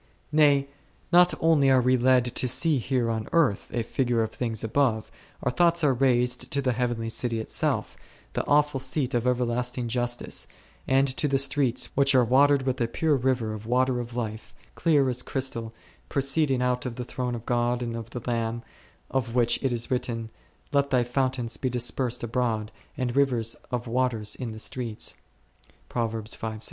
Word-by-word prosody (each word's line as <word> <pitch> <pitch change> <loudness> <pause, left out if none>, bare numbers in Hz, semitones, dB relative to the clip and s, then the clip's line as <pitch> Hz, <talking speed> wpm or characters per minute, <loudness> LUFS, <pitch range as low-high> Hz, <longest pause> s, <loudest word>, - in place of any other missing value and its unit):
Nay, 145 -2 +4 0.4
not 180 0 +6
only 155 -4 +4
are 130 -1 +5
we 125 +1 +3
led 125 0 +4
to 130 - +1
see 145 +4 +3
here 125 -2 0
on 110 -1 -3
earth 150 -12 +2
a 120 - -1
figure 120 -1 0
of 110 - -4
things 115 -3 -3
above, 110 -1 0 0.3
our 125 - +1
thoughts 170 +2 +3
are 140 -3 +4
raised 125 0 +1
to 140 - +1
the 130 -2 +1
heavenly 120 -1 -1
city 115 0 -2
itself, 110 - -1 0.4
the - - -1
awful 150 -1 +3
seat 130 0 -1
of 120 0 0
everlasting 125 0 0
justice, 120 +1 -2 0.4
and 135 +1 +3
to 150 - +1
the 135 -1 +2
streets 135 -2 +1
which 140 0 +3
are 125 -2 +5
watered 140 +3 +4
with 130 -1 -1
a 115 - +2
pure 150 +5 +1
river 125 -4 0
of 110 0 -8
water 125 +1 +2
of 120 0 -6
life, 110 -2 -5 0.2
clear 150 -5 +2
as 125 -1 0
crystal, 125 -5 -3 0.4
proceeding 135 -1 +1
out 125 0 0
of 120 - -5
the 125 - -4
throne 125 0 -3
of 115 0 -8
God 120 0 0
and 115 -1 -4
of 115 -2 -6
the 120 - -7
Lamb, 115 -1 -2 0.5
of 120 -3 -1
which 120 -2 +2
it 135 - +1
is 120 +1 -2
written, 115 -3 -2 0.4
Let 140 0 +2
thy 125 -3 +3
fountains 125 -1 -1
be 130 - -1
dispersed 125 0 -1
abroad, 115 -2 -1 0.3
and 125 -2 -2
rivers 125 -5 +1
of 120 -1 -3
waters 115 -3 -1
in 120 -3 -5
the 110 - -8
streets 115 0 -5 0.8
d. 110 -1 -3
125 Hz, 175 wpm, -26 LUFS, 115-135 Hz, 0.8 s, not